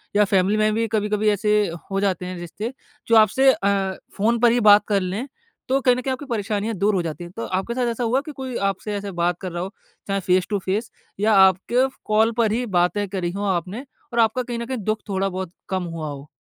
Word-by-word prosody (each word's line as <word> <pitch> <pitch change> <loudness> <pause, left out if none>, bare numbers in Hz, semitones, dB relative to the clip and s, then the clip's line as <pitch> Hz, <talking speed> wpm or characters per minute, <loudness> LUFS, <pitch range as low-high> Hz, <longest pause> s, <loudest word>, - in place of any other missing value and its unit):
या 210 - +6
फ़ैमिली 195 +1 +2
में 215 0 +2
भी 225 +1 0
कभी-कभी 210 -1 +1
ऐसे 210 +1 +1 0.4
हो 195 - 0
जाते 190 -2 0
हैं 180 0 -5
रिश्ते, 205 +8 -5 0.3
जो 230 - +4
आपसे 225 +5 +6
अ, 195 -1 0 0.2
फ़ोन 230 +4 +2
पर 240 0 +5
ही 245 - +2
बात 210 -2 +7
कर 200 -2 +2
लें, 195 +8 -3 0.4
तो 270 +1 +3
कहीं 250 -2 +4
न 250 - -3
कहीं 265 +1 -2
आपकी 265 +3 -4
परेशानियाँ 220 -2 -2
दूर 200 +2 +1
हो 185 - +1
जाती 170 +1 -5
हैं। 175 - -9
तो 230 - -4
आपके 190 +5 -2
साथ 245 -1 0
ऐसा 235 +2 -3
हुआ 245 +4 +1
कि 305 +1 -8
कोई 260 -2 -5
आपसे 200 +2 -5
ऐसे 200 0 -4
बात 175 0 +1
कर 185 -2 -4
रहा 175 +1 -3
हो, 195 +3 -7 0.3
चाहे 195 0 0
फेस 185 -1 +1
टू 205 - 0
फेस 210 +4 -1 0.3
या 215 +2 +3
आपके 195 +7 +4 0.2
कॉल 220 +2 +3
पर 225 -3 +3
ही 240 +3 0
बातें 180 +4 +1
करी 185 -3 -2
हो 200 +2 -4
आपने 190 - -2 0.3
और 235 - 0
आपका 225 +2 +3
कहीं 240 -1 -4
न 235 - -4
कहीं 260 +1 -3
दुःख 215 0 -1
थोड़ा 195 0 0
बहुत 185 -2 -5 0.2
कम 185 -1 -1
हुआ 165 -2 -5
हो? 140 0 -8
205 Hz, 240 wpm, -22 LUFS, 190-230 Hz, 0.4 s, बात